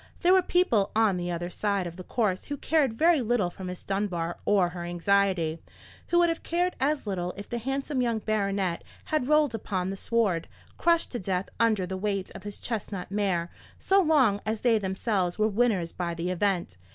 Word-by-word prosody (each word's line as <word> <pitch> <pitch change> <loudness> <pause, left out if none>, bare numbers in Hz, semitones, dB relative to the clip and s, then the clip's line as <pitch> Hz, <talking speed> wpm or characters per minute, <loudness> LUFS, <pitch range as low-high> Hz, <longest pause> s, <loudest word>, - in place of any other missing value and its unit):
There 360 +1 +5
were 380 - +6
people 345 - +2
on 215 -4 +3
the 175 0 -3
other 175 +1 -3
side 200 -1 -1
of 170 -1 -6
the 185 - -8
course 200 -3 -1
who 290 - -4
cared 290 -5 +1
very 330 -1 +4
little 230 -6 +1
for 190 - -10
Miss 180 -1 -6
Dunbar 185 -4 -2
or 195 -4 +3
her 175 -1 -6
anxiety; 175 -2 +1 0.5
who 345 - +2
would 345 0 +5
have 330 - -2
cared 355 +2 0
as 285 0 0
little 180 -3 -3
if 200 - -7
the 240 - -3
handsome 270 +2 -2
young 235 -2 +1
baronet 200 -5 -1 0.2
had 305 -5 0
rolled 300 -3 +3
upon 190 -4 -2
the - - -4
sward, 195 -5 0 0.3
crushed 335 -1 +2
to 240 - -3
death 185 0 -2
under 220 -5 +3
the 190 +1 -4
weight 195 -1 -2
of - - -9
his 205 +1 -7
chestnut 200 -5 -5
mare, 190 -4 0 0.3
so 390 +1 +3
long 265 - +3
as 220 0 -2
they 230 -3 +3
themselves 190 -2 -1
were 215 0 +3
winners 205 -6 +1
by 170 -2 -3
the 170 +2 -2
event. 180 - -1
200 Hz, 200 wpm, -27 LUFS, 180-245 Hz, 0.5 s, were